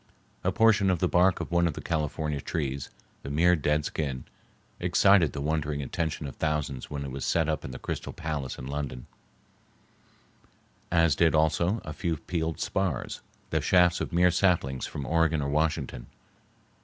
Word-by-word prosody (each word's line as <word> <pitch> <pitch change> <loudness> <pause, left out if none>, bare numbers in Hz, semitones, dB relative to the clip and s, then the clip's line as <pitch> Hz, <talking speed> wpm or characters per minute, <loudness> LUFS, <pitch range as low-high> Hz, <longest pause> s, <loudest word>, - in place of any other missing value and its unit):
A - - +2
portion 110 -3 +4
of 90 - +2
the 90 - +1
bark 90 +2 +3
of - - -5
one 85 0 +3
of 80 - -3
the - - -5
California 75 -2 -2
trees, 70 -4 -3 0.3
the - - -7
mere 85 +5 +4
dead 75 0 0
skin, 70 -5 -3 0.6
excited 90 -1 +4
the 70 - -4
wondering 75 -1 -1
attention 80 +2 -3
of 70 - -7
thousands 75 -4 -2
when 70 -1 -4
it 70 - -6
was 70 0 -5
set 80 -2 +1
up 80 -1 -1
in - - -6
the - - -7
Crystal - - -5
Palace 75 -5 -4
in - - -7
London, 70 -3 -4 1.9
as 85 -3 +4
did 80 -2 +3
also 80 +7 +2
a 80 - -5
few 85 -1 -2
peeled 80 0 -3
spars, 95 -10 -2 0.3
the - - +1
shafts 90 -1 +4
of - - -3
mere 90 +1 +4
saplings 85 -8 +1
from 70 -3 -6
Oregon 80 -1 +2
or 70 - -2
Washington. 75 -4 -1
80 Hz, 170 wpm, -28 LUFS, 70-85 Hz, 1.9 s, portion